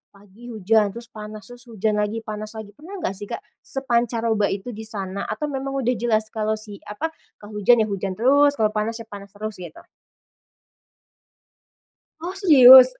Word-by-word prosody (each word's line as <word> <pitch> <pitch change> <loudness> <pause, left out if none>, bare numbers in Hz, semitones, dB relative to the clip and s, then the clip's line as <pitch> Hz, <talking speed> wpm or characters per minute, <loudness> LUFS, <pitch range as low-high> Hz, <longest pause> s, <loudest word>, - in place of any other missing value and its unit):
pagi 205 +4 -15
hujan 215 -2 +1
terus 235 0 -9
panas, 215 -1 -8
terus 245 0 -13
hujan 215 -1 -1
lagi, 215 +2 -2
panas 215 0 -6
lagi 220 -2 -8
pernah 315 - -11
nggak - - 0
sih 205 - -7
Kak? - - -6 0.2
Sepancaroba 235 -5 0
itu 200 +5 -4
di 220 0 -7
sana 200 -2 -5
atau - - -4
memang 270 0 -3
sudah 245 - +2
jelas 220 -2 +2
kalau 215 0 -1
si 215 -2 -8
apa 295 +11 -3 0.2
kalo 210 0 -9
hujan 225 +2 +5
ya - - -2
hujan 195 -1 -3
terus, 285 +6 +4
kalau 215 -5 +2
panas 215 +2 -1
ya 230 - -6
panas 200 -1 -8
terus 215 -1 -6
gitu? 175 -3 -10 2.4
Oh 350 +2 -4
serius? 265 -9 +10
220 Hz, 170 wpm, -23 LUFS, 210-245 Hz, 2.4 s, serius